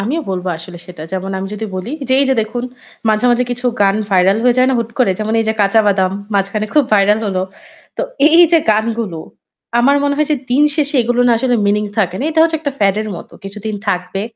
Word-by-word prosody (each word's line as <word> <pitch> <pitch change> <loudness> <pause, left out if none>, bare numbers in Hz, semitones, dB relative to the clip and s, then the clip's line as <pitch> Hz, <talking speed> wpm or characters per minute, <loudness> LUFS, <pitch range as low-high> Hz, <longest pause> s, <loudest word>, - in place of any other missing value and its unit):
আমিও 260 +11 -1
বলব 185 -1 -3
আসলে 175 +1 -10
সেটা। 175 -4 -10
যেমন 190 0 -3
আমি 190 - -4
যদি 210 - -5
বলি 185 +5 -5 0.2
যে - - +1
এই - - +3
যে 265 - +3
দেখুন 240 +3 -5 0.4
মাঝে, 215 +1 +1
মাঝে 240 +1 +2
কিছু 245 +1 -3
গান 195 0 +3
ভাইরাল 190 +1 +3
হয়ে 245 -1 +4
যায় 255 - +4
না - - +1
হুট 230 -1 -3
করে? 250 -6 +3
যেমন 215 0 -2
এই - - -1
যে - - +2
'কাঁচা 205 +2 +4
বাদাম' 190 -2 +1 0.2
মাঝখানে 200 +2 -1
খুব 300 -2 +4
ভাইরাল 205 +1 +4
হলো। 185 -2 -1 0.5
তো - - -2 0.3
এই 330 +2 +5
যে 335 - +7
গানগুলো 220 -4 -1 0.6
আমার 275 +4 +4
মনে 285 0 +1
হয় 300 0 +1
যে - - +2
দিন 265 +4 +3
শেষে 295 -1 -1
এগুলো 245 +1 0
না 240 - +4
আসলে 245 0 +1
মিনিং 210 +1 +1
থাকে 185 -4 +1
না। - - -3
এটা 320 0 +1
হচ্ছে 325 0 +2
একটা 285 -3 -3
প্যাড 195 -1 +3
এর 215 - -4
মত। - - -10 0.2
কিছুদিন 210 +2 -6
থাকবে 180 0 -2
215 Hz, 230 wpm, -16 LUFS, 195-250 Hz, 0.6 s, যে